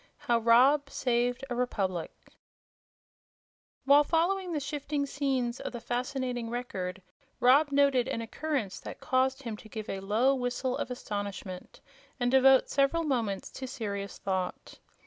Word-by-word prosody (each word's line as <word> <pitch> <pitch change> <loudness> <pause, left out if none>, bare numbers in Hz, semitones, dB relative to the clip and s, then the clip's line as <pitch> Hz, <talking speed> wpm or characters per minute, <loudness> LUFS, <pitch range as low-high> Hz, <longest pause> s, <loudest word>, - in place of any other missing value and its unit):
How 235 -1 +1
Rob 260 +5 +5
Saved 245 0 0
A - - +1
Republic 195 -8 -1 1.7
While 285 +2 +7
following 355 +4 +1
the 310 - -1
shifting 285 0 -2
scenes 265 -4 -1
of - - -5
the 240 - -5
fascinating 250 0 -3
Record 190 -7 -4 0.4
Rob 280 +4 +5
noted 280 -3 +3
an - - -2
occurrence 230 -2 -3
that - - -9
caused 265 +1 +1
him 230 -3 -4
to 220 - -14
give 215 0 -6
a 195 - -4
low 215 +8 +2
whistle 250 0 -1
of - - -3
astonishment 205 -6 -6 0.4
and 245 0 +1
devote 265 0 +6
several 280 +4 +2
moments 230 -10 -1
to 260 - -6
serious 200 -5 -5
thought. 190 -2 -4
250 Hz, 140 wpm, -29 LUFS, 225-275 Hz, 1.7 s, While